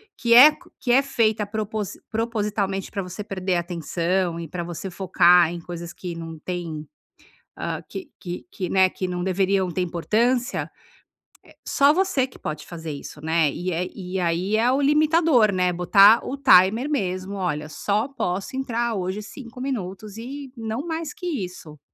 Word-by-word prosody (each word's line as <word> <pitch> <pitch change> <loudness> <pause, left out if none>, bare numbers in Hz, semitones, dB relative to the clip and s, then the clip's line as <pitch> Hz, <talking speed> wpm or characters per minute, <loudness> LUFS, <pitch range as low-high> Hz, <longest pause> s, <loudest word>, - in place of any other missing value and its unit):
que 235 0 +3
é 295 +5 +9 0.2
que 245 - -1
é 265 +3 +6
feita 220 -6 +1
propo 215 +1 -3 0.3
propositalmente 210 -4 -2
para 195 - -3
você 185 +3 -7
perder 190 -2 -2
a 175 - +1
atenção 170 +1 -1
e 165 - -6
para 175 +3 -5
você 175 +2 -6
focar 180 -2 +4
em 175 - -5
coisas 170 0 -7
que 175 0 -7
não 165 -1 -7
têm, 165 -2 -5 0.7
hã, - - -3
que 335 -6 -8
que 175 -2 -6
que, 185 -4 -4
né, 190 -1 +5
que 185 0 -4
não 180 0 -3
deveriam 190 0 +1
ter 185 - -2
importância. 230 +9 0 1.0
Só 280 +2 +4
você 360 -8 +1
que 255 - -17
pode 155 0 -6
fazer 165 -3 -7
isso, 145 +1 -9
né. 160 -1 +2
E 180 +2 -4
aí 180 +5 0
é 240 +3 +3
o 275 +2 +1
limitador, 300 -5 +4
né, 180 -2 +1
botar 195 +5 +6
o 275 - -3
timer 250 0 +5
mesmo. 190 -6 -2
Olha, 155 -5 -3
só 210 +8 0
posso 200 -6 -3
entrar 240 -3 -1
hoje 190 +1 -3
5 250 +2 -10
minutos 210 -4 -5
e 270 +2 -7
não 225 +6 -4
mais 320 -2 -4
que 360 - -8
isso. 180 - -5
195 Hz, 165 wpm, -23 LUFS, 175-240 Hz, 1.0 s, é